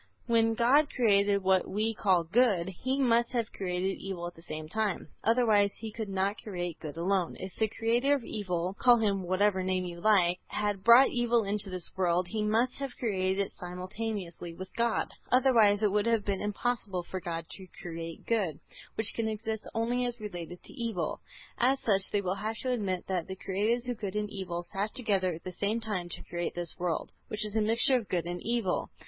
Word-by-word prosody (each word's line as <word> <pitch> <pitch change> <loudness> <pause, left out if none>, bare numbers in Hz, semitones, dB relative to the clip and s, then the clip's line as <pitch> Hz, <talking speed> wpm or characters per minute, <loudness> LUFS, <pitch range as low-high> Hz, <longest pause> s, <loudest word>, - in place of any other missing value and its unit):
When 225 -1 +3
God 270 +6 +4
created 200 -4 +3
what 190 0 +3
we 215 +3 0
call 190 -5 +2
good, 190 -1 +2
He 260 +9 -2
must 240 -2 +3
have 235 -2 -1
created 185 0 -2
evil 190 -3 -5
at 175 - -5
the 165 - -16
same 155 -2 -6
time, 215 +2 -2
otherwise 220 -3 +4
He 220 -1 -6
could 220 -1 -5
not 195 +2 0
create 175 -5 -4
good 155 0 -7
alone. 180 0 0
If 190 -1 -6
the 220 - +1
creator 240 +5 +3
of 270 - -4
evil, 185 -4 -3
call 245 -1 +6
him 205 -3 +1
by 180 - -7
whatever 190 +1 +2
name 185 0 0
you 170 -1 -7
like, 180 -4 +4
had 205 -2 -2
brought 235 +4 +8
evil 240 -1 +2
into 200 0 -1
this 185 -2 -3
world, 180 -1 +1
he 220 +2 -2
must 225 +5 +1
have 275 -2 -4
created 195 -3 0
it - - -12
simultaneously 180 -1 -5
with 185 +1 -9
God; 235 0 +1 0.2
otherwise 230 -5 +5
it 210 - +4
would 210 +2 +1
have 230 -3 +2
been 195 -2 -1
impossible 210 -3 -2
for 185 +2 -5
God 165 -2 -4
to 190 -1 -9 0.2
create 165 -1 -6
good, 190 -10 0 0.4
which 220 0 +1
can 230 -1 -1
exist 220 0 -4
only 240 +2 +1
as 240 0 -5
related 175 -4 -7
to - - -11
evil. 225 - -3 0.4
As 265 +3 +3
such 195 -5 +3
they 205 - +1
will 185 -1 -1
have 220 +1 -2
to 255 - 0
admit 195 -7 -1
that 185 -3 -2
the 190 - -5
Creators 215 +6 0
of 245 -3 -3
good 200 -2 -4
and 210 0 -2
evil 180 -3 -4
sat 200 +4 -3
together 195 -7 +1
at 165 - -12
the 185 - -5
same 205 +5 -1
time 205 -6 -3
to - - -7
create 175 0 -3
this 175 -1 -3
world, 175 -3 -2 0.2
which 215 0 0
is 210 0 -6
a 220 - +3
mixture 230 +4 +4
of 225 -5 -6
good 175 -2 0
and 175 0 -4
evil. 230 -5 -1
205 Hz, 205 wpm, -30 LUFS, 180-225 Hz, 0.4 s, brought